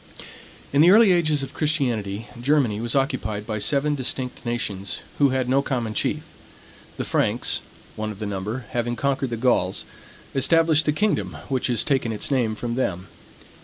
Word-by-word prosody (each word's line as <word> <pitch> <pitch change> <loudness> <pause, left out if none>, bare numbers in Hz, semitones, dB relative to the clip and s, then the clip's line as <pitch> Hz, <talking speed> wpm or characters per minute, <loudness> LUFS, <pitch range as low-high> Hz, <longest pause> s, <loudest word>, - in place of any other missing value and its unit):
In 140 - +5
the 170 - +7
early 210 +1 +7
ages 155 -5 +2
of 135 - -7
Christianity, 120 -9 -1 0.2
Germany 125 -6 +2
was 120 +2 0
occupied 125 -7 -1
by 110 -1 -3
seven 145 +5 +2
distinct 130 -2 -3
nations, 105 -5 -3 0.2
who 140 -1 +5
had 130 -1 0
no 135 +2 +3
common 120 -6 -2
chief. - - -1 0.7
The - - -3
Franks, - - +1 0.3
one 110 0 -3
of 105 - -7
the 105 - -5
number, 105 +5 -4
having 120 0 -1
conquered 135 +1 0
the 115 - -3
Gauls, 110 -6 +1 0.5
established 160 +2 +3
the - - +5
kingdom 205 +8 0
which 130 -2 0
has 120 -3 +2
taken 135 -5 0
its 110 +6 -3
name 120 -5 +1
from 120 +2 -4
them. 95 -8 -2
125 Hz, 165 wpm, -23 LUFS, 110-140 Hz, 0.7 s, the